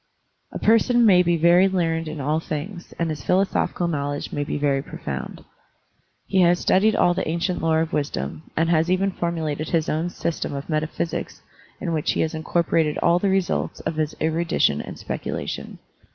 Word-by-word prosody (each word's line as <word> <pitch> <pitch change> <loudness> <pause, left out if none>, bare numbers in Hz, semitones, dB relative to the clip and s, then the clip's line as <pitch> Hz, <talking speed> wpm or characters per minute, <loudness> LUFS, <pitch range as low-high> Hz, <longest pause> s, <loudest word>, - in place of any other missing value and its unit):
A - - -5
person 230 +2 +4
may 185 -4 +6
be 175 -1 +2
very 175 +4 +5
learned 165 -3 0
in 155 0 -5
all 150 +3 0
things, 170 +4 -6
and 170 - 0
his 150 -3 -6
philosophical 185 -2 +1
knowledge 145 -3 -3
may 145 - -1
be 145 - -3
very 140 -2 +1
profound. - - -7 0.8
He 190 - +2
has 175 0 +5
studied 210 +5 +3
all 175 - +4
the 185 - -2
ancient 170 +3 -1
lore 160 -1 +2
of 165 +1 -3
wisdom, 80 - -3
and 165 +1 +3
has 165 +1 +2
even 190 +2 +2
formulated 160 -4 -3
his 165 -2 +1
own 160 +3 -1
system 170 -4 -3
of 140 +1 -5
metaphysics 155 +2 -3 0.4
in 170 -4 -2
which 155 -2 0
he - - 0
has 160 - -1
incorpo 160 +1 -1
rated 155 -2 +2
all 170 +1 +3
the 200 - +1
results 175 - 0
of 155 - -3
his 155 -1 -1
erudition 160 - +1
and - - -8
specu - - -4
lation. - - -5
165 Hz, 185 wpm, -23 LUFS, 155-175 Hz, 0.8 s, may